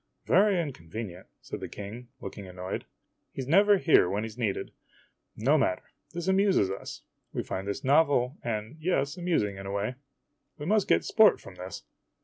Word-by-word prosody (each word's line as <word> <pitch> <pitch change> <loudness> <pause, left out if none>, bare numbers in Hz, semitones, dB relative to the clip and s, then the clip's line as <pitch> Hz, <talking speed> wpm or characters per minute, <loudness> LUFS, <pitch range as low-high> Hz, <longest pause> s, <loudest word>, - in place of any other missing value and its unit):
" - - -49
Very 195 0 +4
inconvenient," 100 - -6
said - - -7
the - - -6
King, 110 +5 -8
looking 100 0 -7
annoyed. 90 +1 -5 0.5
"He 135 - -4
's - - -9
never 200 +6 +6
here 160 - +5
when 100 +3 -1
he 115 - -4
's 110 - -13
needed. 115 -5 -2 0.7
No 140 +8 +3
matter. 90 -8 -1 0.2
This 175 0 -5
amuses 190 - +3
us. - - -7 0.3
We - - -2
find 95 +1 -4
this 100 - -3
novel 140 -2 +3
and 110 +4 -3
yes 155 -3 0
amusing 165 - 0
in 95 0 -7
a - - -4
way. 100 +5 -1 0.6
We 145 - -6
must 210 +3 +2
get - - +3
sport 220 -2 +5
from - - -12
this. 90 0 -8
120 Hz, 180 wpm, -28 LUFS, -, 0.7 s, never